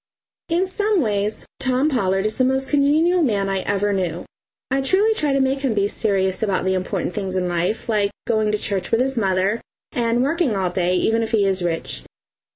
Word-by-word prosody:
In 345 +3 +2
some 410 +1 0
ways 210 -2 -1
Tom 260 +2 +1
Pollard 195 -8 0
is 215 - -1
the 255 - +3
most 265 +1 0
congenial 310 +5 +3
man 205 -9 +1
I 195 0 0
ever 205 +1 0
knew. 175 -3 -2 0.5
I 270 +1 +2
truly 390 +10 +3
try 300 -9 0
to 275 - +2
make 265 +1 +1
him 265 -5 -1
be 200 -1 +2
serious 195 -3 0
about 200 -4 0
the 190 - +2
important 185 -1 -2
things 195 -2 -3
in 180 -1 0
life, 175 +5 -1
like 210 -3 +1 0.2
going 220 -2 +1
to 210 - +1
church 200 -2 -2
with 225 - +2
his 265 +1 0
mother 195 0 +1 0.3
and 235 0 +1
working 285 - +1
all 185 -2 0
day, 180 0 0
even 225 +5 +1
if 225 0 -3
he 205 -3 +3
is 190 -1 0
rich. 165 - -3
215 Hz, 205 wpm, -21 LUFS, 190-270 Hz, 0.5 s, the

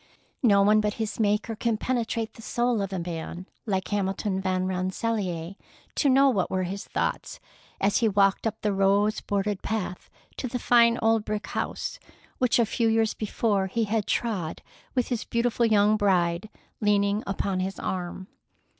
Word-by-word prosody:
No 200 -5 +5
one 215 +1 +5
but 210 0 -1
his 220 -1 -4
Maker 210 +1 +1
can 230 0 0
penetrate 230 -2 -2
the - - -13
soul 240 -1 0
of 195 -1 -3
a 190 - -2
man 170 +1 -5 0.2
like 190 -2 -1
Hamilton 195 -1 -1
Van 185 -1 0
Rensselaer 185 -1 -2 0.4
to 285 - +2
know 270 +1 +6
what 205 -9 +1
were 185 0 0
his 195 +2 -5
thoughts - - -2 0.4
as 200 +1 +2
he 225 - +3
walked 200 +1 +3
up 220 0 -4
the 210 -1 +1
rose 200 +2 +2
bordered 200 0 -1
path 210 -5 -4 0.3
to 255 - -3
the 250 - -3
fine 235 -1 +4
old 225 -1 +3
brick 210 0 -3
house, - - -4 0.4
which 250 -2 +3
a 235 - +4
few 230 +2 0
years 225 -1 +2
before 205 -2 0
he 230 +4 0
had 215 -1 -1
trod 195 -9 -2 0.3
with 250 -2 +1
his 240 -4 -1
beautiful 235 0 +1
young 210 0 +4
bride 185 -1 +1 0.3
leaning 205 0 +2
upon 195 -1 -1
his 190 +1 -3
arm. 185 0 -4
210 Hz, 170 wpm, -26 LUFS, 190-225 Hz, 0.4 s, know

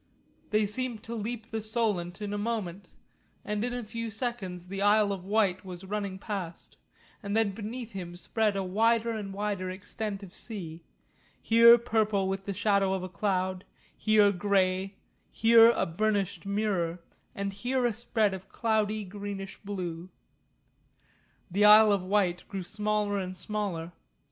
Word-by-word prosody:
They 215 0 +2
seemed 230 +1 -1
to 230 - -6
leap 225 0 -5
the 220 0 -2
Solent 215 -4 -1
in 205 0 -3
a - - -1
moment, 205 -4 -3 0.6
and 210 0 -2
in 245 - -1
a 245 0 -4
few 230 +1 -5
seconds 205 -6 -3
the 195 +1 -5
Isle 205 0 +4
of 190 -2 -5
Wight 200 -2 +1
was 180 -1 -8
running 200 -1 -3
past, 190 -4 -6 0.5
and 200 0 -2
then 220 -3 +2
beneath 225 +4 -6
him 175 -3 -7
spread 210 +4 0
a 195 - -1
wider 225 +4 +2
and 210 -3 -4
wider 200 -2 -2
extent 200 +2 -5
of 185 -2 -11
sea, 170 -8 -7 0.6
here 230 +1 +7
purple 215 -4 +1
with 195 0 -3
the 200 - -3
shadow 200 -1 +2
of 185 - -4
a 185 - -5
cloud, 185 0 -1 0.3
here 215 -2 +4
grey, 190 0 +1 0.3
here 230 +1 +7
a 235 - +1
burnished 200 +2 -1
mirror, 190 -5 -1 0.3
and 200 0 -3
here 245 +5 -1
a 240 - +2
spread 220 -2 0
of 190 0 -8
cloudy 215 -2 0
greenish 200 0 -6
blue. 180 -4 -5 1.4
The 205 +3 +3
Isle 210 0 +9
of 200 -2 +2
Wight 185 -2 +1
grew 195 -2 -5
smaller 210 +1 -1
and 185 -1 -5
smaller. 185 -5 -3
205 Hz, 155 wpm, -29 LUFS, 190-220 Hz, 1.4 s, Isle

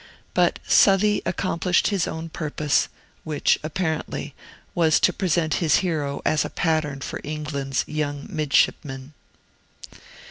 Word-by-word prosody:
But - - +2
Southey 205 +1 +5
accomplished 180 -1 +1
his 195 -4 0
own 160 +1 -5
purpose, 150 -2 0 0.3
which, 155 -2 +1
apparently, 160 0 -3 0.4
was 160 -3 +3
to - - +3
present 170 -4 0
his 160 -3 +4
hero 145 -5 -2
as 155 -1 +2
a - - -4
pattern 155 -4 -1
for - - -5
England's 145 -3 -2
young 145 -2 -3
midshipmen. 140 -2 0
155 Hz, 115 wpm, -24 LUFS, 145-170 Hz, 0.4 s, Southey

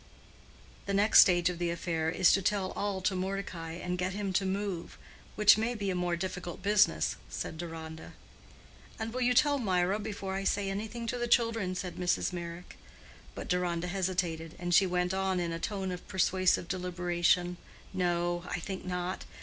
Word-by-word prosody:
"The 200 - 0
next 205 +2 +6
stage 175 -2 +6
of 180 -1 -2
the 175 -1 0
affair 165 -1 -1
is 180 +1 +4
to 195 - +3
tell 195 0 0
all 200 -2 -2
to 190 +2 +1
Mordecai, 185 -3 -4
and 180 +1 -4
get 180 +1 -1
him 200 -1 -3
to 195 0 +1
move—which 200 +2 +1
may 235 +2 0
be 200 -3 -2
a - - -2
more 180 -1 0
difficult 180 0 -5
business," 200 - +3
said - - -5
Deronda. 160 -2 -7 0.8
"And 220 0 -4
will 255 - -2
you 250 0 +3
tell 290 +1 +4
Mirah 190 -2 +1
before 205 -2 -4
I 195 0 -2
say 195 0 0
anything 220 +4 -4
to 245 +1 -2
the 240 - -1
children?" 230 -6 +2
said 180 -1 -5
Mrs. 180 0 0
Meyrick. 170 0 -7 0.6
But - - -6
Deronda 180 -1 0
hesitated, 175 -3 -2
and 175 0 -2
she 190 +2 +6
went 180 0 0
on 190 -1 0
in 170 -1 -1
a 165 - -3
tone 190 0 -3
of 180 -1 -7
persuasive 185 -1 +2
deliberation—"No, 175 0 -1
I - - -2
think 190 +2 -5
not. 180 0 -3
185 Hz, 175 wpm, -31 LUFS, 175-200 Hz, 0.8 s, next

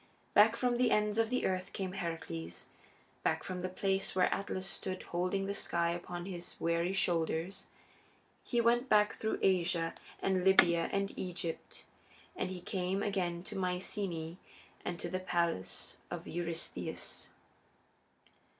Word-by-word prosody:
Back 215 +2 +7
from 245 -1 +1
the 245 -1 +4
ends 210 0 +3
of 225 -1 +3
the 250 +1 +1
earth 185 -1 -1
came 190 -2 -2
Heracles, 160 - -4 0.6
back - - +1
from 180 -1 -4
the 185 - -1
place 195 +1 0
where 180 -1 +4
Atlas 190 -1 -2
stood 185 +1 -2
holding 185 +3 0
the 200 - -1
sky 170 -3 +1
upon 175 0 -4
his 175 -2 -6
weary 170 +2 +1
shoulders. 170 -1 0 0.8
He 240 - 0
went 240 +2 +3
back 210 0 +5
through 220 - -1
Asia 175 -3 +3 0.3
and 190 -1 +1
Libya 175 -3 +6
and 200 0 0
Egypt, 175 -3 -4 0.5
and 185 - -1
he 185 -1 -5
came 190 +1 -1
again 175 -4 0
to 210 - -7
Myceaæ 180 -2 -2 0.5
and 175 -1 -3
to - - -2
the 185 +2 -2
palace 170 - -1
of - - -5
Eurystheus. 170 -1 -3
185 Hz, 140 wpm, -34 LUFS, 170-195 Hz, 0.8 s, Back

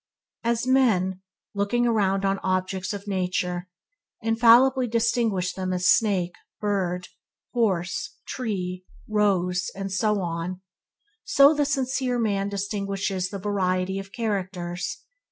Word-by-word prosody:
As 235 +1 0
men, 205 -8 +2 0.3
looking 205 +4 +1
around 195 -4 +2
on 195 0 +1
the - - -12
objects 185 0 -1
of 205 0 -6
nature, 180 -2 -1 0.5
infallibly 240 +3 +5
distinguish 225 -5 +1
them 185 -1 -3
such 185 - 0
as 180 - -3
a - - +1
snake, 190 -4 +3
a - - -27
bird, 185 -4 -1
a - - -16 0.5
horse, 185 -3 0
a - - -47
tree, 185 -7 -3
a 215 - -17
rose, 185 -4 +2
and 195 0 -4
so 210 +1 +1
on 175 +1 -3 0.3
– - - -67 0.3
so 280 +2 +6
the 290 -1 +1
sincere 265 -2 0
man 200 -4 0
distinguishes 200 -1 -2
between 200 -1 -6
the 205 - -5
variety 190 -1 0
of 195 0 -9
characters. 185 -5 -3
195 Hz, 150 wpm, -25 LUFS, 185-225 Hz, 0.5 s, so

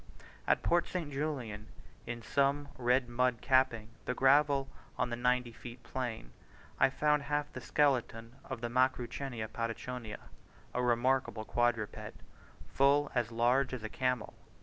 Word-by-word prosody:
At - - +3
Port 175 0 +2
St. 170 -5 -4
Julian, 125 -8 -3 0.4
in 120 0 -5
some 140 +3 +1
red 125 0 +2
mud 125 0 +1
capping 130 -5 +2 0.2
the 125 - -1
gravel 135 +1 +4 0.3
on 125 -1 0
the - - 0
90 125 0 +1
feet 120 +1 -11
plain, 115 - -4 0.5
I - - +6
found 150 +2 +2
half 145 +1 -2
the - - -6
skeleton 125 -4 0
of 130 -4 -6
the 120 - -1
Macrauchenia 125 -1 0
Patachonica, 115 0 -5 0.5
a 125 - 0
remarkable 125 -1 +1
quadruped, 120 -3 -1 0.5
full 140 +2 +3
as 120 -2 0
large 125 +4 +2
as 120 - -8
a 110 - -4
camel. 125 -1 -1
125 Hz, 140 wpm, -33 LUFS, 120-135 Hz, 0.5 s, I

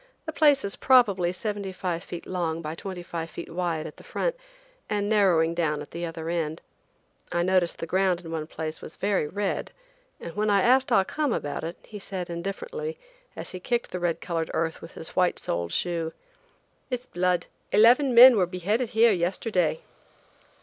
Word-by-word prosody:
The 315 - -4
place 290 -5 +4
is 200 - -3
probably 200 -9 +4
seventy 200 +1 -4
five 180 -2 -3
feet 175 -3 -7
long 165 -3 -2
by 155 0 -4
twenty 180 +1 -6
five 165 -1 -5 0.2
wide 165 -2 -2
at - - -9
the - - -14
front, - - -2 0.5
and 205 -1 0
narrowing 180 -6 +3
down 160 -3 0
at 150 - -9
the 170 +1 -4
other 165 -1 -6
end. 165 -2 -2 0.7
I 175 - +1
noticed 185 -1 +2
the - - -4
ground 185 +1 +1
in 165 -2 -9
one 155 -2 -3
place 160 -1 -5
was - - -9
very 195 -6 0
red, 200 +4 -2 0.5
and 170 - -8
when 215 0 +1
I 200 -2 +4
asked 260 +2 +4
Ah 195 - +5
Cum 295 +6 -1
about 145 -8 -3
it 165 +2 -5
he 210 - -9
said 185 -3 -5
indifferently, 460 - -5 0.4
as - - -6
he 185 - -6
kicked 240 +5 -1
the 180 - -3
red 175 -2 -1
colored 165 -2 -2
earth 160 0 -1
with 165 - -10
his 160 - -8
white 180 -1 +1
souled 85 0 -2
shoe: 165 -2 -1 0.8
"It's 250 -1 -3
blood. 180 0 0 0.3
Eleven 245 +5 +5
men 245 0 +10
were 185 -3 +3
beheaded 205 +7 -1
here 225 +1 +5
yesterday." 180 -2 0
180 Hz, 185 wpm, -26 LUFS, 165-210 Hz, 0.8 s, men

